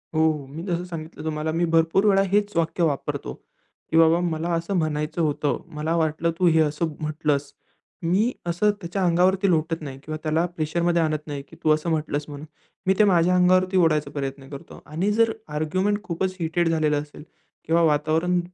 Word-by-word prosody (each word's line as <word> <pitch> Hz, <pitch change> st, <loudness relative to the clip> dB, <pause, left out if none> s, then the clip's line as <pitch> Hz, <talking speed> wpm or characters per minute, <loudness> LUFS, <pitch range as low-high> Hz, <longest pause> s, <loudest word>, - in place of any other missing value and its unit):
हो. 155 Hz, -2 st, +2 dB
मी 160 Hz, +4 st, -7 dB
जसं 175 Hz, -2 st, -2 dB
सांगितलं 165 Hz, -3 st, -8 dB
तुम्हाला 155 Hz, 0 st, -2 dB
मी 170 Hz, +2 st, +1 dB
भरपूर 165 Hz, +5 st, +3 dB
वेळा 195 Hz, -2 st, +5 dB
हेच 205 Hz, 0 st, +2 dB
वाक्य 165 Hz, +1 st, 0 dB
वापरतो 145 Hz, -4 st, -2 dB
की, 160 Hz, -, -8 dB
"बाबा 165 Hz, +1 st, +5 dB
मला 170 Hz, -1 st, -2 dB
असं 170 Hz, +4 st, -2 dB
म्हणायचं 155 Hz, 0 st, -1 dB
होतं", 150 Hz, -2 st, 0 dB
"मला 155 Hz, +2 st, -1 dB
वाटलं 160 Hz, +1 st, 0 dB
तू 180 Hz, -, +4 dB
हे 160 Hz, -1 st, +4 dB
असं 155 Hz, +1 st, -1 dB
म्हटलंस" 150 Hz, -2 st, -1 dB, 0.5 s
मी 195 Hz, +8 st, +2 dB, 0.2 s
असं 175 Hz, +5 st, +2 dB
त्याच्या 185 Hz, +2 st, -3 dB
अंगावरती 185 Hz, +3 st, +3 dB
लोटत 165 Hz, -1 st, 0 dB
नाही 135 Hz, -3 st, -7 dB
किंवा 155 Hz, 0 st, -5 dB
त्याला 160 Hz, +2 st, +1 dB
प्रेशरमध्ये 170 Hz, +2 st, 0 dB
आणत 155 Hz, -1 st, -1 dB
नाही 145 Hz, -2 st, -4 dB
की, -, -, -15 dB
"तू 155 Hz, -, +2 dB
असं 155 Hz, +2 st, -2 dB
म्हटलंस" 150 Hz, -2 st, -1 dB
म्हणून, 145 Hz, 0 st, -8 dB, 0.4 s
मी 190 Hz, -, +5 dB
ते -, -, +7 dB
माझ्या 180 Hz, -3 st, +4 dB
अंगावरती 185 Hz, +1 st, +3 dB
ओढायचा 155 Hz, -4 st, +2 dB
प्रयत्न 135 Hz, -1 st, -5 dB
करतो 140 Hz, -1 st, -10 dB
आणि 170 Hz, +7 st, -1 dB
जर 225 Hz, +1 st, +3 dB, 0.2 s
आर्ग्युमेंट 185 Hz, +7 st, 0 dB
खूपच 185 Hz, +1 st, -2 dB
हीटेड 170 Hz, +1 st, 0 dB
झालेल 155 Hz, -2 st, +1 dB
असेल 145 Hz, 0 st, -4 dB, 0.4 s
किंवा 165 Hz, +1 st, +2 dB
वातावरण 160 Hz, +3 st, +2 dB
165 Hz, 180 wpm, -24 LUFS, 155-175 Hz, 0.5 s, ते